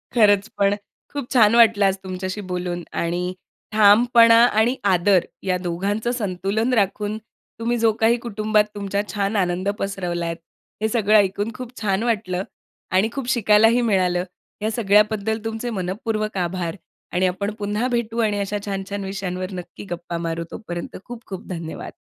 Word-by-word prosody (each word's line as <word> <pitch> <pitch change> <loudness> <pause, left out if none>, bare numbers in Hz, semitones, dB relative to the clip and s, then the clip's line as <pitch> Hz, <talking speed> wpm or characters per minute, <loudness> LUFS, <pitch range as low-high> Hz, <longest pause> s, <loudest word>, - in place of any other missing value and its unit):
खरंच 205 -3 +4
पण, 200 0 +3 0.4
खूप 285 -4 -4
छान 225 -3 +5
वाटलं 225 -3 +6
आज 195 -1 +3
तुमच्याशी 185 +2 -4
बोलून 175 -1 -3
आणि 175 +2 -1 0.4
ठामपणा 230 +2 +6
आणि 235 +2 +2
आदर, 190 -1 +3 0.2
या 185 -1 +1
दोघांचं 195 +6 -2
संतुलन 210 +1 -1
राखून 210 -1 0 0.4
तुम्ही 235 +1 0
जो 225 -1 +3
काही 230 +2 +4
कुटुंबात 215 -1 +2
तुमचा 200 0 -1
छान 200 0 -1
आनंद 185 0 0
पसरवलात, 175 -4 -2 0.5
हे 220 - +2
सगळं 215 -2 +2
ऐकून 205 +2 +1
खूप 250 -1 -8
छान 200 0 0
वाटलं 190 -6 -1 0.5
आणि 190 +4 +3
खूप 270 -3 -4
शिकायलाही 225 0 +4
मिळालं. 185 -6 +2 0.4
या 215 - 0
सगळ्याबद्दल 210 0 +2
तुमचे 225 +2 -3
मनःपूर्वक 215 +2 -3
आभार 175 -1 -2 0.4
आणि 185 +1 +2
आपण 200 +3 -2
पुन्हा 210 +4 -1
भेटू 235 -1 -1
आणि 210 -2 +1
अशा 200 +1 -2
छान-छान 195 0 -4
विषयांवर 185 -1 -4
नक्की 180 -1 -8
गप्पा 170 0 -4
मारू. 165 0 -3
तोपर्यंत 175 -5 -6
खूप-खूप 225 -6 -8
धन्यवाद. 165 -3 -6
205 Hz, 145 wpm, -22 LUFS, 185-220 Hz, 0.5 s, वाटलं